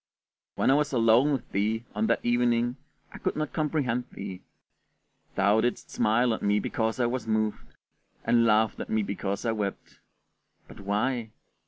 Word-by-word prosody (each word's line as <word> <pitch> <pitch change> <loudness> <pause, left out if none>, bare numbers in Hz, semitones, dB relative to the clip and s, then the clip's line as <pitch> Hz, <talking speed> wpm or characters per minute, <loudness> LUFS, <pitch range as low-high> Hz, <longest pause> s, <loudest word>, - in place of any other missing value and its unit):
When - - +3
I - - +6
was 150 0 +1
alone 120 +4 +4
with 135 -4 -3
thee 110 +4 0
on 105 +1 0
that - - 0
evening 120 +1 +2 0.4
I - - -9
could - - -1
not 155 0 -3
comprehend 140 -6 0
thee: 95 -2 -7 0.9
thou 100 +3 +3
didst 120 +1 -2
smile 115 +2 +2
at - - -4
me 105 0 +2
because 110 +2 -1
I 120 - +3
was 120 0 -2
moved, 110 -1 -1 0.5
and 120 -1 +3
laughed 110 -1 +3
at - - -5
me 110 -1 +1
because 100 +1 -3
I 115 - +2
wept; 105 -3 -4 0.7
but - - -13
why? 110 +4 -1
115 Hz, 165 wpm, -27 LUFS, 105-125 Hz, 0.9 s, I